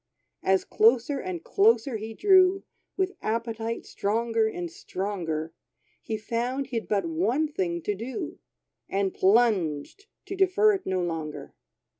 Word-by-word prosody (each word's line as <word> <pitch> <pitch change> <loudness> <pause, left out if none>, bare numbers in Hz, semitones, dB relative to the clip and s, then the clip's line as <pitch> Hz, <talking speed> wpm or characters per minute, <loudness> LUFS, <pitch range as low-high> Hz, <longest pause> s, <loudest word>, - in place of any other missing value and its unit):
As 190 0 +2
closer 240 +5 +3
and 355 0 -5
closer 395 - +3
he 220 +1 -7
drew, 380 - +5 0.3
With 380 0 0
appetite 230 0 -3
stronger 225 +2 0
and 175 -6 -5
stronger, 165 -5 -4 0.5
He 220 - -3
found 240 +5 -2
he'd 240 -4 -4
but 200 -4 0
one 205 - +1
thing 175 - -2
to 210 - 0
do, 265 - -6 0.5
And 195 -1 0
plunged, 195 - +2 0.2
to 390 - -5
defer 390 +3 +4
it 390 -1 -4
no 185 -1 0
longer. 160 -3 -5
225 Hz, 130 wpm, -27 LUFS, 190-300 Hz, 0.5 s, drew